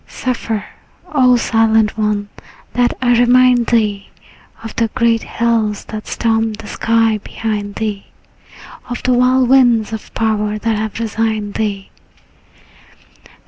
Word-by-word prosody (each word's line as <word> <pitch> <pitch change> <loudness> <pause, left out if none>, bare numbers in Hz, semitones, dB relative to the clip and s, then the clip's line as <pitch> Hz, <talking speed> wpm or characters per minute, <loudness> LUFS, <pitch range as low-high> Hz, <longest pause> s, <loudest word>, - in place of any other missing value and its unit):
Suffer, 230 -4 -3 0.5
O 255 -3 +5
silent 225 -2 +2
one, 210 -1 -1 0.4
that 245 0 +1
I 245 - +3
remind 245 0 +4
thee 210 -4 0 0.5
Of 225 - -8
the 230 - +2
great 235 -3 +2
hills 225 -3 -1
that 215 -1 -7
stormed 225 -1 0
the 215 - -11
sky 225 0 +1
behind 205 -1 -4
thee, 210 -3 -4 0.8
Of 245 - -5
the 255 - +2
wild 250 +1 +3
winds 240 -5 +4
of 220 - -7
power 215 -1 0
that 225 +1 -1
have 215 +1 -4
resigned 220 -2 -2
thee. 200 -3 -3
225 Hz, 125 wpm, -16 LUFS, 215-240 Hz, 0.8 s, O